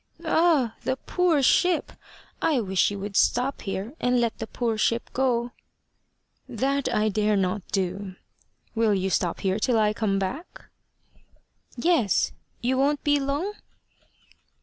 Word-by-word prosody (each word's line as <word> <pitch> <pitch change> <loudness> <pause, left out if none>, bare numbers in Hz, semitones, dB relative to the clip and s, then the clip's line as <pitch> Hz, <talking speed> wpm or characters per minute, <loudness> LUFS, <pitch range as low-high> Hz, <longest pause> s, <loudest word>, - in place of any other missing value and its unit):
"Ah! 310 -9 +2
the 260 - -1
poor 335 -2 +1
ship! 355 +5 +3 0.5
I 305 -5 +2
wish 190 -4 +1
you 205 - -5
would 200 0 -6
stop 250 +6 +2
here, 200 +5 -4
and 245 0 +2
let 235 -2 0
the 225 - -4
poor 230 -1 -2
ship 230 +2 0
go." 245 -2 0 1.0
"That 275 +1 -1
I 215 0 +1
dare 210 0 +1
not 195 +1 0
do. 190 0 -3 0.6
Will 225 -3 +2
you 190 0 -1
stop 175 -2 0
here 190 +1 0
till 240 +1 +2
I 210 -1 +3
come 205 -2 0
back?" 250 - -5 1.0
"Yes. 250 - +2 0.3
You 255 +2 +1
won't 285 +2 +1
be 290 -1 +3
long?" 285 +9 -2
235 Hz, 140 wpm, -25 LUFS, 200-275 Hz, 1.0 s, ship